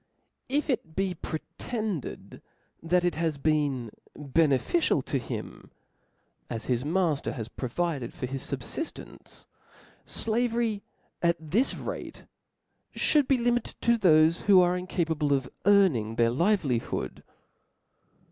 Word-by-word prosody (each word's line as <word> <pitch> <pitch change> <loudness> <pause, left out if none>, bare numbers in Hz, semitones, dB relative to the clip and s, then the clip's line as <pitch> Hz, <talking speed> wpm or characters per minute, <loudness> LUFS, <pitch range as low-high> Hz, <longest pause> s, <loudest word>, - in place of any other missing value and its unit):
If 290 +3 0
it 170 - -2
be 190 -1 0
pretended, 195 - -5 0.4
that 175 +2 +2
it 175 -4 0
has 160 -3 0
been 140 -6 0 0.3
beneficial 145 - +2
to 135 - -1
him; 120 - -7 0.8
as 115 -1 -4
his 125 -1 0
mafter 160 -2 0
has 115 -6 -5
provided 135 +1 -3
for - - -5
his 135 +1 -4
fubfidence; 140 - -6 0.6
flavery, 230 -2 0 0.4
at 170 0 +2
this 240 +8 +2
rate, - - -7 0.7
ftiould 295 -4 +3
be 270 - +4
limited 240 -1 0
to 235 0 +3
thofc 160 -3 +5
who 195 -2 +7
are 180 0 +4
incapable 165 -5 0
of 135 -2 0 0.2
earning 160 - +4
their 115 0 +3
livelihood. 135 - 0
165 Hz, 115 wpm, -28 LUFS, 135-205 Hz, 0.8 s, who